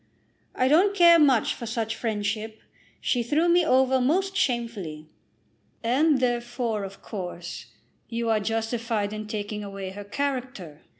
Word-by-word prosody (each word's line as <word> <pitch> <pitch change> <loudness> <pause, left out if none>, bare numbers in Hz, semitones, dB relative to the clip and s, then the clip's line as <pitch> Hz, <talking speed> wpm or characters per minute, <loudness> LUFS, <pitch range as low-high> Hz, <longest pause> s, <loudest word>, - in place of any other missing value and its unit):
"I 255 - +2
don't 370 +8 +4
care 340 -3 +7
much 270 -7 +4
for 235 - -7
such 225 0 -2
friendship. 220 0 -3 0.4
She 245 - +1
threw 295 +8 +1
me 345 +1 +4
over 260 -3 +3
most 380 +9 +1
shamefully." 220 - -2 0.8
"And 275 +5 +3
therefore, 240 -3 -1
of 195 0 -9
course, 175 -3 -6 0.4
you 235 0 -2
are 220 -1 +3
justified 225 0 -2
in 215 0 -6
taking 210 0 -4
away 195 -1 -6
her 205 +2 -8
character. 245 - -4
230 Hz, 135 wpm, -26 LUFS, 210-265 Hz, 0.8 s, care